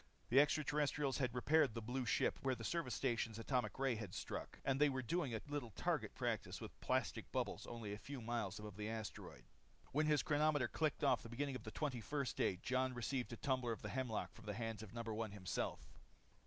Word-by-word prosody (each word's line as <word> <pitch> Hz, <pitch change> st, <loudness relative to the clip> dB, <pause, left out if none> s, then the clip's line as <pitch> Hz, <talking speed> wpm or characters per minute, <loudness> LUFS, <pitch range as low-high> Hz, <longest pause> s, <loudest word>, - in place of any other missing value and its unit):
The 130 Hz, -, +7 dB
extra 150 Hz, +1 st, +5 dB
terrestrials 145 Hz, -2 st, +1 dB
had 125 Hz, -3 st, +1 dB
repaired 140 Hz, 0 st, +4 dB
the -, -, -1 dB
blue 125 Hz, +2 st, -1 dB
ship -, -, +2 dB
where 130 Hz, -1 st, +2 dB
the -, -, -7 dB
service 160 Hz, -9 st, 0 dB
station 115 Hz, -4 st, 0 dB
atomic 120 Hz, -1 st, 0 dB
ray 135 Hz, -1 st, +2 dB
had 105 Hz, -5 st, -5 dB
struck. -, -, -4 dB
And 135 Hz, +1 st, +2 dB
they 150 Hz, -, +7 dB
were 130 Hz, -1 st, -1 dB
doing 140 Hz, -2 st, 0 dB
a 110 Hz, -, -2 dB
little 145 Hz, -5 st, -2 dB
target 105 Hz, -, -1 dB
practice -, -, -1 dB
with -, -, -8 dB
plastic -, -, 0 dB
bubbles -, -, -1 dB
only 115 Hz, -4 st, -4 dB
a 105 Hz, -, -5 dB
few 140 Hz, +2 st, -6 dB
miles 115 Hz, -4 st, -1 dB
above 105 Hz, -2 st, -7 dB
the 105 Hz, 0 st, -2 dB
asteroid. 110 Hz, -2 st, -5 dB, 0.5 s
When 155 Hz, +2 st, +3 dB
his 150 Hz, -1 st, +4 dB
chronometer 150 Hz, -3 st, +3 dB
clocked 155 Hz, +3 st, 0 dB
off 140 Hz, -, +5 dB
the 115 Hz, -, -9 dB
beginning 135 Hz, +3 st, -1 dB
of 120 Hz, -, -6 dB
the -, -, -3 dB
twenty 135 Hz, -4 st, -1 dB
first 140 Hz, +2 st, -1 dB
day, -, -, +2 dB
Jon 130 Hz, 0 st, +1 dB
received 125 Hz, +1 st, -1 dB
a 115 Hz, -, -5 dB
tumbler 130 Hz, -3 st, +1 dB
of 110 Hz, -, -8 dB
the 105 Hz, -, -3 dB
hemlock 125 Hz, -2 st, -1 dB
from 120 Hz, -, -13 dB
the 105 Hz, -, -2 dB
hands 115 Hz, -2 st, -3 dB
of 110 Hz, -, -8 dB
No. 115 Hz, 0 st, -4 dB
1 110 Hz, -2 st, -2 dB
himself. 95 Hz, -3 st, -3 dB
125 Hz, 220 wpm, -41 LUFS, 110-140 Hz, 0.5 s, The